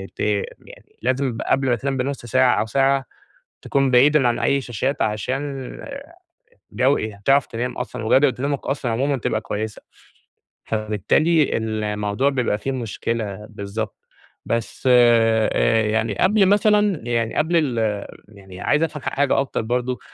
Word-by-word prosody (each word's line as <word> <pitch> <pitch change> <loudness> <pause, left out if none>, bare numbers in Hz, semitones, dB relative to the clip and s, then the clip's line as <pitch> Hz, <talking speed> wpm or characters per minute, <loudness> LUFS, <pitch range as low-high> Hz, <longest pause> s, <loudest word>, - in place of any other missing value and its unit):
ت - - -30
يعني 105 -2 -4
لازم 130 -1 -1
قبل 135 -1 +2
ما 120 - +3
تنام 135 +2 -3
بنُص 135 0 -3
ساعة 130 +1 +3
أو - - 0
ساعة، 135 +3 +1 0.6
تكون 135 -1 +1
بعيد 135 +5 +5
عن 120 -5 +2
أي 140 +3 +1
شاشات، 125 +2 -2
عشان 130 +5 -3 1.0
جو 135 +2 +2 0.3
تعرف 135 0 +4
تنام 125 +2 -4
أصلًا، 120 -3 -5
وجودة 135 +3 +4
نومك 140 0 -2
أصلًا 135 -3 -1
عمومًا 135 +4 0
تبقى 110 -2 -2
كويِسة. 110 0 -5 0.8
فبالتالي 110 - +1
الموضوع 105 +2 -1
بيبقى 125 -6 0
في 135 +6 -3
مشكلة. 110 -4 -4
بالضبط، 105 0 -5 0.5
بس 115 +3 -2
آآ، 115 -2 +4
يعني، 110 +1 0
قبل 200 +1 +4
مثلًا 205 -2 +3
يعني، 115 -2 -1
قبل 165 +3 +1
ال 115 -9 0 0.2
يعني 95 -3 -13
عايِز 150 +2 +2
أفهم 150 -3 -4
ح - - -1
حاجة 140 -1 +1
أكتر 135 - -3
برضه. 125 +2 -2
125 Hz, 140 wpm, -21 LUFS, 110-140 Hz, 1.0 s, بعيد